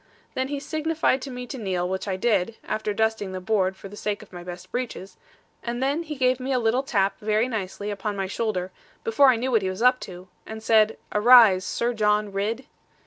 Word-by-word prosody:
Then 260 0 -1
he 285 0 -3
signified 310 -2 0
to 275 - -6
me 250 -1 -6
to 260 +1 -7
kneel, 185 -4 -1
which 190 +2 -3
I 190 - -1
did 210 0 +1
(after 215 -1 -2
dusting 220 -2 -1
the 185 - -4
board, 190 -1 0
for 195 - -9
the 200 - -11
sake 210 0 -3
of 200 - -19
my 175 -1 -8
best 175 0 -9
breeches), 245 -6 -5 0.5
and 235 0 -3
then 285 +5 +1
he 310 -2 -6
gave 255 -1 +2
me 260 +1 -3
a 260 - +2
little 240 +2 +2
tap 200 -7 0
very 215 +2 +1
nicely 205 -3 -4
upon 205 +1 -3
my 195 -1 -2
shoulder, 190 -2 -2 0.3
before 225 +5 +4
I 255 - +5
knew 250 +3 -2
what 225 -3 +3
he 190 - -1
was 185 +5 -4
up 250 0 +5
to; 180 -1 -9 0.2
and 220 0 -8
said, 220 -1 +4 0.2
'Arise, 210 -4 +7
Sir 240 +1 -1
John 210 -1 +1
Ridd!' 215 +6 -2
220 Hz, 220 wpm, -25 LUFS, 195-250 Hz, 0.5 s, Arise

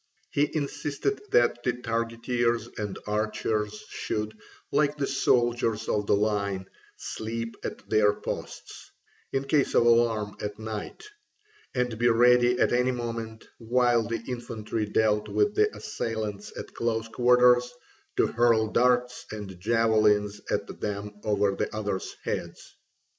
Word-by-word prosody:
He 145 +1 +2
insisted 140 -2 -2
that 120 0 +3
the 125 0 0
targeteers 115 0 -1
and 105 -2 -3
archers 105 0 -1
should, 105 0 -3 0.4
like 150 0 +2
the 140 - 0
soldiers 120 -4 +1
of 105 -1 0
the - - +4
line, 100 -2 0 0.3
sleep 115 +1 -5
at - - -6
their 105 -1 +4
posts, - - -7 0.4
in 135 0 0
case 140 0 +1
of 120 - +5
alarm 115 -3 +3
at 105 0 -4
night, 110 - -6 0.7
and 125 -3 -1
be 120 0 +4
ready 120 +1 +5
at - - +3
any 125 +1 +3
moment, 115 -2 -5
while 120 0 +3
the 115 0 -3
infantry 115 -3 -3
dealt 105 0 +1
with 415 0 +2
the 425 0 +3
assailant 105 -3 -4
at - - -7
close 115 -1 -1
quarters, 125 +1 +4 0.5
to - - +5
hurl 115 -2 +3
darts 125 +1 +2
and 100 -4 -7
javelins 105 -1 +2
at - - 0 0.2
them 105 0 -3
over 105 -2 +2
the - - -2
others' 100 -3 -3
heads. - - -5
115 Hz, 130 wpm, -27 LUFS, 105-125 Hz, 0.7 s, of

